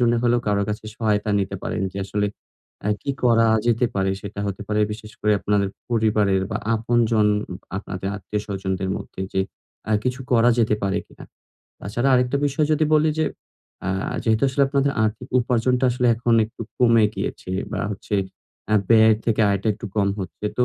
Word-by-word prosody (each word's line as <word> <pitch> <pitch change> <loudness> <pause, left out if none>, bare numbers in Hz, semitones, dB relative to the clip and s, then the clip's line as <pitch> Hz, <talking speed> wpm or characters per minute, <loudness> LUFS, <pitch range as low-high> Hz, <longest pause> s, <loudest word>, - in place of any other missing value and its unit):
জন্য 120 -1 +3
হলেও 120 0 +3
কারো 100 0 +2
কাছে 105 +1 -4
সহায়তা 105 -2 0
নিতে 95 - -3
পারেন - - -2
যে 100 - -5
আসলে 105 +1 -1 0.6
আ - - +1
কি 140 - -1
করা 115 -1 +5 0.2
যেতে 120 +1 +3
পারে 95 0 +1
সেটা 100 0 -6
হতে 100 +1 -4
পারে 105 0 +1
বিশেষ 110 0 -9
করে 105 - +3
আপনার 105 -1 +1 0.3
পরিবারের 105 -4 +2
বা 105 - -1 0.2
আপনজন 115 -1 +2 0.5
আপনাদের 95 -1 -5
আত্মীয়স্বজনদের 95 -1 -3
মধ্যে - - -8
যে 95 - +2 0.5
আ - - +3
কিছু 125 +1 -1
করা 120 0 +5
যেতে 110 -2 +3
পারে 100 +1 0
কিনা। - - -14 0.6
তাছাড়া 120 +6 -1
আরেকটা 125 +2 +2
বিষয় 145 +2 +1
যদি 155 +1 +3
বলি 155 0 +4
যে 155 - +3 0.6
অ্যা 95 +1 -2
যেহেতু 110 +1 +2
আসলে 140 +2 +1
আপনাদের 140 0 +1
আর্থিক 110 +4 -3
উপার্জনটা 125 +1 +1
আসলে 125 0 0
এখন 120 0 +2
একটু 115 +1 -9 0.2
কমে 115 -3 +5
গিয়েছে - - -4 0.2
বা - - -2
হচ্ছে 105 +1 -4 0.6
আ - - +5 0.2
ব্যয়ের 110 -1 +6
থেকে 115 -1 +2
আয়টা 100 +1 -1
একটু 110 +1 -8
কম 100 -1 +3
হচ্ছে। 95 +3 -5
তো 125 - +5
110 Hz, 175 wpm, -23 LUFS, 100-120 Hz, 0.6 s, ব্যয়ের